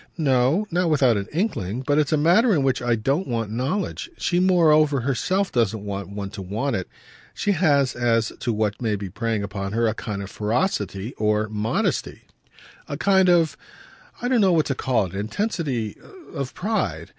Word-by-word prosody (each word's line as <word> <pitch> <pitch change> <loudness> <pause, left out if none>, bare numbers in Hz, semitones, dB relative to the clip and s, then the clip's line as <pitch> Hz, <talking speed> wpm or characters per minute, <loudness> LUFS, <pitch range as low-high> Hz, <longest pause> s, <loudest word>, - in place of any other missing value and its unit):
"No, 140 +5 +2
not 175 0 +1
without 135 -6 +4
an 100 0 -2
inkling; 130 - -2
but 145 +2 +2
it's 150 0 +1
a 155 - +3
matter 185 +9 +4
in 145 - +1
which 135 -1 +1
I 120 -1 +1
don't 135 - -1
want 115 -3 -2
knowledge. 150 - -2
She 175 - 0
moreover 155 -6 +4
herself 185 +10 0
doesn't 110 -3 0
want 100 -2 -5
one 100 -1 -6
to 105 - -7
want 110 +9 -2
it: 95 - -3 0.5
she 205 - 0
has, 145 -7 +2
as 115 -2 +1
to 120 - -1
what 105 -1 -1
may 110 -3 0
be 100 -2 -6
preying 115 0 -2
upon 100 0 -4
her, 115 +1 +1
a 110 - +1
kind 105 -3 -5
of 100 - -9
ferocity 110 - -1
of 105 0 +1
modesty, 110 +1 -1 0.7
a 145 - -3
kind 190 +2 +4
of 165 -5 +3 0.6
I 245 - -2
don't 250 -3 +3
know 190 -3 +4
what 160 -2 +3
to 135 - 0
call 125 -5 0
it 90 - -9
intensity 125 - -2 0.4
of 135 -2 -5
pride. 145 - -2
125 Hz, 185 wpm, -23 LUFS, 105-165 Hz, 0.7 s, without